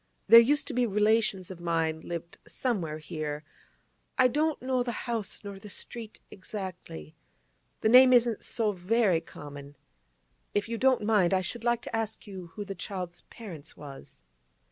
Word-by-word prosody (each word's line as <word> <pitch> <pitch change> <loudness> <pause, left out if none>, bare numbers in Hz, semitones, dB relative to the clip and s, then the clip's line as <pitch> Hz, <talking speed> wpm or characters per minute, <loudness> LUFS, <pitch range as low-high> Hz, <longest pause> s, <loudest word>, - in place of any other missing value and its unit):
There 230 - +10
used 290 +6 +3
to 285 - -3
be 245 -1 +2
relations 210 -2 +2
of 180 - -9
mine 165 -2 0
lived 170 0 -7
somewhere 180 -12 -2
here; 155 -1 -5 0.7
I 255 0 +6
don't 305 +4 0
know 255 0 0
the 245 -1 -3
house, 225 -5 -3
nor 200 -1 -7
the 210 - -11
street 225 +2 -7
exactly. 185 - -7 0.7
The 220 - +3
name 255 +2 +9
isn't 240 -2 +3
so 225 -3 +1
very 190 -1 +2
common. 145 -3 -10 0.8
If 205 +1 +1
you 230 -1 -3
don't 260 -4 +3
mind, 200 -4 +3
I 185 - +2
should 230 +5 -3
like 240 -1 +1
to - - -4
ask 220 -1 -2
you 190 -4 -8
who 205 - -5
the 195 - -5
child's 180 -1 -6
parents 170 - -9
was. 135 - -11
205 Hz, 165 wpm, -29 LUFS, 170-235 Hz, 0.8 s, There